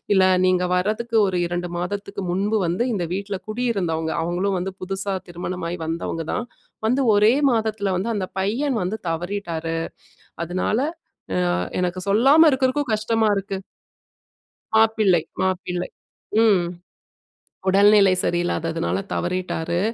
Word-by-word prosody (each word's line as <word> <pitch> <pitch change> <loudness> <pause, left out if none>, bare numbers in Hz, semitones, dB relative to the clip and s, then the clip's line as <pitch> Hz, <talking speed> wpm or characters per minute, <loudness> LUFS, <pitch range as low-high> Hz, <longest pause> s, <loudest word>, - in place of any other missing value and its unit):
"இல்ல 190 - +5 0.2
நீங்க 185 0 +2
வரதுக்கு 215 +5 0
ஒரு 185 -2 0
2 175 0 -3
மாதத்துக்கு 200 +2 -4
முன்பு 205 +4 +1
வந்து 175 +8 0
இந்த 185 -5 -1
வீட்டில 195 0 -3
குடியிருந்தவங்க, 195 -9 -1
அவங்களும் 185 +3 0
வந்து 190 +2 -4
புதுசா 195 +1 -2
திருமணமாகி 175 0 -4
வந்தவங்க 165 +1 -3 0.2
தான். 240 - -2 0.4
வந்து 255 +4 +2
1 210 +3 +5 0.2
மாதத்தில 220 -3 0
வந்து 195 +6 -2
அந்த 195 -2 -1
பையன் 240 +8 0
வந்து 190 +5 -2
தவறீட்டாரு. 165 -1 -3 0.7
அதனால, 185 +6 -1 0.8
அ - - 0 0.2
எனக்கு 180 0 -1
சொல்லாம 275 +10 +6
இருக்கறதுக்கும் 260 -1 +1
கஷ்டமா 220 0 +1
இருக்கு." 195 0 -3 1.2
மாப்பிள்ளை, 220 -6 +4 0.2
மாப்பிள்ளை. 180 -1 -1 0.5
ம். 200 -6 +4 1.0
"உடல்நிலை 200 0 +6
சரியில்லாததுனால 170 -1 -1 0.2
தவறீட்டாரு. 175 -1 -2
195 Hz, 115 wpm, -22 LUFS, 175-215 Hz, 1.2 s, சொல்லாம